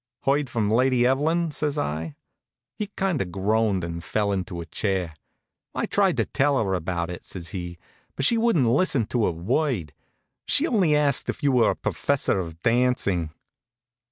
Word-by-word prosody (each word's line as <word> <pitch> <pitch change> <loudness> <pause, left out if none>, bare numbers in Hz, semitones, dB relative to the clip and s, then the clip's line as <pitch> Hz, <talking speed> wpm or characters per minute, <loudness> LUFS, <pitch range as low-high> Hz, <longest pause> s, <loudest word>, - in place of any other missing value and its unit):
"Heard 140 0 +1
from 110 -3 0
Lady 125 +1 +3
Evelyn?" 155 +6 +1
says 150 0 -2
I. 80 - -3 0.6
He 210 - -4
kind 190 -7 0
of 90 - -4
groaned 100 0 +1
and 85 0 -5
fell 105 +2 0
into 90 -2 -3
a 85 - -5
chair. 95 -3 -2 0.6
"I - - 0
tried - - +2
to - - +2
tell 140 0 +1
her 100 -6 0
about 85 -1 -2
it," 90 - -8
says 85 -2 -7
he; 90 -3 -6 0.4
"but 135 - 0
she 230 - +4
wouldn't 225 - +3
listen 130 -1 +2
to 115 0 0
a - - +1
word. 95 - -1 0.5
She 290 - +4
only 190 - +2
asked 145 -3 +1
if 160 - -4
you 140 - +4
were 125 -3 +4
a - - 0
professor 140 -8 0
of 85 -3 -6
dancing." 115 -8 +1
115 Hz, 175 wpm, -25 LUFS, 90-145 Hz, 0.6 s, she